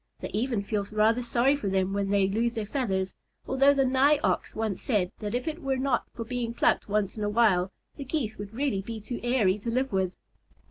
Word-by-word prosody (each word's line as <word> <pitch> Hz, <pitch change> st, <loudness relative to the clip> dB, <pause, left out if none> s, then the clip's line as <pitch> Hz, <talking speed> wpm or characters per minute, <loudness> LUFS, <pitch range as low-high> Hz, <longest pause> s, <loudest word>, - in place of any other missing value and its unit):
They -, -, -5 dB
even 225 Hz, -2 st, -1 dB
feel 205 Hz, 0 st, -1 dB
rather 220 Hz, +3 st, +3 dB
sorry 245 Hz, +3 st, +2 dB
for 250 Hz, -8 st, -4 dB
them 190 Hz, 0 st, 0 dB
when 200 Hz, -1 st, -1 dB
they 200 Hz, -1 st, +3 dB
lose 230 Hz, +4 st, 0 dB
their 220 Hz, -2 st, -2 dB
feathers, 195 Hz, -6 st, -1 dB, 0.3 s
although 275 Hz, +1 st, +4 dB
the 270 Hz, -1 st, +3 dB
Nigh 265 Hz, +3 st, +4 dB
Ox -, -, 0 dB
once 220 Hz, -3 st, -2 dB
said 200 Hz, -8 st, 0 dB
that 210 Hz, +1 st, -3 dB
if 250 Hz, +4 st, -2 dB
it 320 Hz, +2 st, -3 dB
were 270 Hz, -2 st, 0 dB
not 260 Hz, -2 st, 0 dB
for 230 Hz, -, -5 dB
being 235 Hz, -1 st, -3 dB
plucked -, -, +2 dB
once 205 Hz, 0 st, 0 dB
in 210 Hz, -, -3 dB
a 205 Hz, -, 0 dB
while, 200 Hz, -4 st, +3 dB, 0.3 s
the 280 Hz, -, -5 dB
Geese 255 Hz, -7 st, -3 dB
would 205 Hz, -1 st, -6 dB
really 245 Hz, -4 st, -1 dB
be 225 Hz, +3 st, -6 dB
too 235 Hz, +3 st, -6 dB
airy 225 Hz, -6 st, +2 dB
to 230 Hz, -, -4 dB
live 255 Hz, 0 st, 0 dB
with. 190 Hz, -1 st, 0 dB
225 Hz, 225 wpm, -28 LUFS, 200-255 Hz, 0.3 s, although